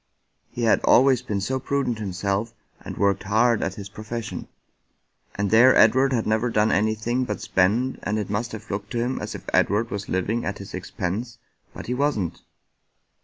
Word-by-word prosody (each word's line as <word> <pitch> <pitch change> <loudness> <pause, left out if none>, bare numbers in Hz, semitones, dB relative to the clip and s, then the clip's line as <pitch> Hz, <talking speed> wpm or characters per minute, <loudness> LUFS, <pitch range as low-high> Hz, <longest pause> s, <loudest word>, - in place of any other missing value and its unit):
" - - -49
He 120 - -5
had 115 - +4
always 130 -1 +5
been 105 -6 -3
so 130 +6 -1
prudent 130 -3 -1
himself, 100 +3 -2 0.2
and - - -8
worked 100 -1 +2
hard 115 +3 +2
at 95 - -2
his 100 -1 -7
profession, 110 +3 -6 0.9
and 100 -1 -1
there 120 +4 +7
Edward 130 +5 +5
had 120 -4 0
never 110 +3 +1
done 110 -1 +2
anything 110 +5 0
but 105 -4 -4
spend, 110 +8 +1
and 105 +2 -2
it 105 - -2
must 110 +4 -2
have 110 0 -8
looked 100 0 -4
to - - -2
him 120 +3 -1
as - - -5
if - - -9
Edward 110 +4 +2
was 100 0 -5
living 105 +6 -1
at 100 - -3
his 100 - -10
expense, 95 +5 -4 0.3
but - - -9
he 125 - -2
wasn't." 125 - -1
110 Hz, 185 wpm, -24 LUFS, 100-120 Hz, 0.9 s, there